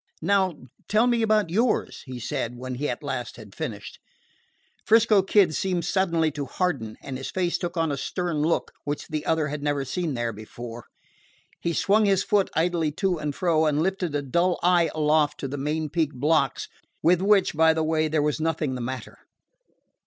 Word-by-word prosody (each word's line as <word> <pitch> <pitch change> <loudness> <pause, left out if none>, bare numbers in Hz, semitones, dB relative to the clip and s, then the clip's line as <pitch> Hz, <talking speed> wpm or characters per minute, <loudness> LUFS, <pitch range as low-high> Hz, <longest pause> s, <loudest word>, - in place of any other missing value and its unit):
"Now 190 -4 +2 0.3
tell 215 +3 +3
me 240 -2 +2
about 215 -5 +2
yours," 225 +5 0
he 130 -1 -6
said 125 -1 -3
when 130 +1 -5
he 145 +4 -2
at 120 - -4
last 130 -4 -4
had 105 -4 -12
finished. - - -6 0.8
'Frisco 220 -2 +5
Kid 190 -3 +3
seemed 180 -1 -1
suddenly 170 -4 +1
to 145 -1 -5
harden, 135 - -2
and 130 -2 -5
his 135 - -5
face 180 -2 -1
took 175 0 -4
on 165 -2 +1
a 140 - -2
stern 175 +3 -2
look 155 +3 0
which 145 0 -4
the 155 -1 -3
other 160 -2 +1
had 150 0 -4
never 145 -1 -1
seen 165 0 -2
there 120 -1 -2
before. 115 +2 -9 0.7
He 170 - -1
swung 210 +5 +3
his 195 -2 +3
foot 205 -2 +2
idly 165 -1 +1
to 180 0 0
and 150 -2 -3
fro, 160 -3 +2
and 150 +1 +1
lifted 185 -4 -1
a 145 - -1
dull 170 +7 +1
eye 175 -2 +4
aloft 150 -1 +2
to 135 - -2
the 135 - -5
main 155 +3 -1
peak 155 -2 -1
blocks, 150 +5 +1 0.4
with 175 +1 +4
which, 200 0 +3
by 160 +1 +5
the 160 0 0
way, 155 0 +1
there 155 -1 +1
was 150 +1 0
nothing 155 -3 -1
the 125 - -4
matter. 130 +1 -6
160 Hz, 190 wpm, -25 LUFS, 145-180 Hz, 0.8 s, Frisco